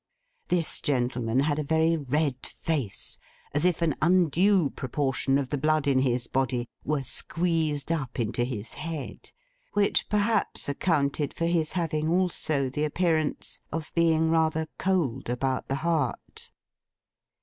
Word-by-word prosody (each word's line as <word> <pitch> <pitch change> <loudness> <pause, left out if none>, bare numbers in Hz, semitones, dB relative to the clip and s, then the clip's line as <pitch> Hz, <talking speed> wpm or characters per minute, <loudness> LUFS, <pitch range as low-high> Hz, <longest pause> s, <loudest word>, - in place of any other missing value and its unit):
This 175 -3 +1
gentleman 125 -2 +1
had 145 +1 +1
a - - 0
very 160 +2 +2
red 145 -2 -1
face, 140 - -4 0.3
as 145 +4 +1
if 175 -2 +2
an 160 -3 +2
undue 180 0 +3
proportion 135 0 0
of 135 -2 -2
the 145 - -2
blood 155 0 +2
in 135 -2 +4
his 125 -2 +1
body 125 -1 -1 0.2
were 150 -2 -1
squeezed 160 0 0
up 135 -6 -2
into 120 +1 0
his 120 -3 -4
head; 155 -2 -6 0.4
which 205 -1 +2
perhaps 210 +2 +1
accounted 140 -1 0
for 165 - -1
his 165 -2 +1
having 160 -3 -1
also 165 -6 +1
the 140 +4 -2
appearance 155 -1 0
of 160 0 -5
being 160 -1 +3
rather 160 -1 +1
cold 150 -11 0
about 130 +1 -1
the 135 - -1
heart. 165 -3 -2
150 Hz, 140 wpm, -27 LUFS, 135-165 Hz, 0.4 s, in